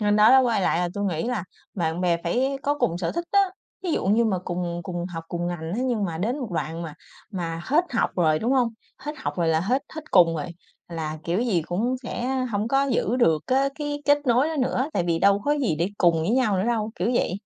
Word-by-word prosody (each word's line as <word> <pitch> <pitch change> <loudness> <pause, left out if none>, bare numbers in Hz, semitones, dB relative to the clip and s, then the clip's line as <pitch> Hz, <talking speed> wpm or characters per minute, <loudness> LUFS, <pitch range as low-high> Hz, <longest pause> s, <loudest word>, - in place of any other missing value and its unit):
nên 205 0 +2
đó 215 +2 +7
đó, 265 - +8
quay 235 -5 +1
lại 175 - +1
là 175 0 0
tôi 205 - -2
nghĩ 170 -5 -1
là 230 -7 -2 0.3
bạn 165 -2 -1
bè 175 -2 +2
phải 265 +10 0
có 290 - +1
cùng 225 -10 0
sở 170 - -2
thích 340 +1 -3
á, 400 - +6 0.4
ví 355 -3 -1
dụ - - -1
như 220 +4 +4
mà 200 -5 +1
cùng 175 -1 -3
cùng 175 -2 -4
học, 165 -3 -7
cùng 175 0 -3
ngành, 170 -2 -4
thế 250 - -1
nhưng 240 -5 0
mà 165 -4 -3
đến 235 - -1
một 250 -7 -5
đoạn 165 +1 -3
mà 160 -3 -7 0.4
mà 165 -4 -4
hết 310 +6 +3
học 235 - +1
rồi, 155 -3 +3
đúng 235 +8 0
hông? 255 -3 +3 0.3
Hết 295 +3 -5
học - - -3
rồi 170 -2 +1
là 160 0 +2
hết 250 +10 0
hết 315 -1 -8
cùng 170 -3 +5
rồi, 150 - -3 0.4
là 160 -2 -4
kiểu 175 +5 0
gì 215 -9 +1
cũng 215 +10 -1
sẽ 240 0 -4 0.3
hổng 210 +1 -1
có 270 +2 +3
giữ 240 -2 +1
được 165 -11 +3
cá 270 +2 +2
cái 290 -1 -4
kết 290 0 +5
nối 250 +4 +3
đó 320 - -3
nữa, 255 +1 0
tại 175 - 0
vì 165 -1 +1
đâu 200 +2 +4
có 290 - +2
gì 260 - 0
để 170 +3 +1
cùng 170 -3 +4
với 165 - 0
nhau 230 -5 +2
nữa 185 - 0
đâu, 225 -2 0
kiểu 190 +7 -1
vậy, 205 - +1
205 Hz, 260 wpm, -24 LUFS, 170-255 Hz, 0.4 s, đó